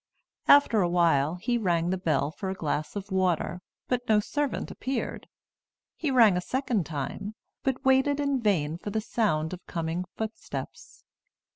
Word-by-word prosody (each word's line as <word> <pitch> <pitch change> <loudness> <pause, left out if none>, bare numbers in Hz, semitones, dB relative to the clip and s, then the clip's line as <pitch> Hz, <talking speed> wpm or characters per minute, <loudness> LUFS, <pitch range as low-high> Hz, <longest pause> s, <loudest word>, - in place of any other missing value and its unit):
After 280 -7 +6
a 175 - +2
while, 165 -3 +3
he 240 +6 -1
rang 175 -4 +1
the - - +1
bell 155 -4 +1
for 190 +4 -5
a 190 - -3
glass 155 -1 -2
of 200 0 -6
water, 180 -1 0 0.3
but 245 -2 -2
no 215 -1 +5
servant 290 +6 -2
appeared. 265 +1 -4 0.7
He 310 - -2
rang 230 -7 +6
a 180 - 0
second 240 - -1
time, 160 +8 -4 0.3
but 265 0 -2
waited 265 +2 +4
in 280 -3 0
vain 165 -7 +1
for 205 - -5
the 220 +2 -1
sound 160 -8 0
of 180 - -8
coming 165 +2 -2
footsteps. 220 0 -6
195 Hz, 160 wpm, -27 LUFS, 170-245 Hz, 0.7 s, After